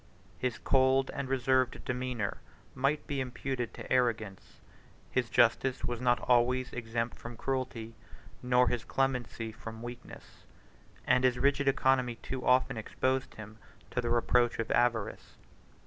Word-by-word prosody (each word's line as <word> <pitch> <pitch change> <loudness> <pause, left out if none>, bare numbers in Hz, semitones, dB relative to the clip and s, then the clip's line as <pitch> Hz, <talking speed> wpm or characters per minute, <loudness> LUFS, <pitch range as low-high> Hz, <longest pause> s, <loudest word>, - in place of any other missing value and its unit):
His 125 -2 -1
cold 135 0 +3
and 140 -1 -4
reserved 130 -1 +1
demeanor 125 -5 -2 0.3
might 140 +3 0
be 140 -2 -2
imputed 125 -1 -3
to - - -4
arrogance; 115 -6 -1 0.5
his 125 -2 0
justice 125 +2 +2
was 120 -1 -3
not 125 -1 +3
always 125 +1 +2
exempt 115 0 -3
from 120 0 -8
cruelty, 125 -4 -3 0.5
nor 125 0 +3
his 120 -2 -1
clemency 125 -4 -1
from 110 +1 -9
weakness; 120 0 -10 0.6
and 130 - +3
his 125 -1 +3
rigid 140 +2 +2
economy 130 -2 +2
too 130 +2 -6
often 125 0 +3
exposed 130 +4 -1
him 110 0 -10 0.3
to 125 - 0
the 120 - -2
reproach 120 0 +2
of 115 - -2
avarice. 120 -3 0
125 Hz, 135 wpm, -31 LUFS, 120-130 Hz, 0.6 s, cold